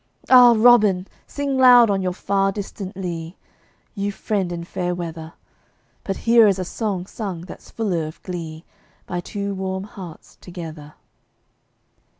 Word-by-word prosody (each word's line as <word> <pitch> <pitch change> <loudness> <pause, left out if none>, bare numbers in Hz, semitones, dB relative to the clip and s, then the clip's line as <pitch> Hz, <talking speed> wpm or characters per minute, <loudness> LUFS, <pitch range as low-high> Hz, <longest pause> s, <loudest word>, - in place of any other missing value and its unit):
Ah, 245 -2 +8
Robin! 215 -5 +5 0.2
sing 280 -2 -2
loud 245 -4 +7
on 195 -1 0
your 185 -1 -1
far 195 +2 0
distant 195 -2 -7
lea, 170 -2 -5 0.6
You 200 -1 -2
friend 200 -3 -2
in 170 -1 -5
fair 180 +1 -3
weather! 165 -2 -7 0.7
But 195 - -3
here 230 -1 +5
is 195 -2 +2
a 185 - -3
song 195 -2 -3
sung 190 -4 -6
that's 180 - -12
fuller 180 -8 -2
of 155 - -11
glee, 165 -3 -7 0.4
By 175 - -4
two 200 +2 -4
warm 190 0 -4
hearts 185 -5 -11
together. 160 -4 -9
190 Hz, 145 wpm, -21 LUFS, 175-210 Hz, 0.7 s, Ah